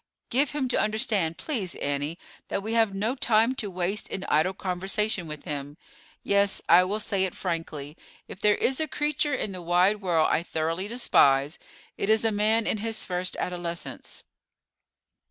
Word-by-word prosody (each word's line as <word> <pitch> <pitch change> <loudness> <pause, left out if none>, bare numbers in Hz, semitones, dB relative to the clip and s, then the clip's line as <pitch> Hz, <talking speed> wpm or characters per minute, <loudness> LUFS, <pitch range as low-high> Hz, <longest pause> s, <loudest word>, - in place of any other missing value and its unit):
Give 275 +4 +3
him 290 -3 -2
to - - +1
understand, 210 -7 0
please, 215 - -3
Annie, 145 +3 -2 0.3
that 195 - -3
we 220 +2 -2
have 225 -3 +3
no 215 +5 0
time 230 -2 +3
to 215 -6 -2
waste 185 +3 -2
in 190 - -4
idle 170 +5 +1
conversation 190 0 -1
with 150 -1 -7
him. 145 0 -5 0.5
Yes, 200 0 +2
I 175 +2 +7
will 205 +3 -2
say 200 -2 0
it 190 - -2
frankly, 160 -4 -4 0.3
if - - -10
there 210 -1 +4
is 260 +3 0
a 315 - 0
creature 295 -1 0
in 215 - -3
the 185 -1 -6
wide 180 +5 +3
world 170 -4 +2
I - - +2
thoroughly 165 +3 -2
despise, 145 - +3 0.4
it 200 - -1
is 220 +1 +4
man 220 +1 +2
in 215 - 0
his 225 0 -3
first 180 0 -3
adolescence." 175 -1 -5
195 Hz, 170 wpm, -27 LUFS, 170-220 Hz, 0.5 s, I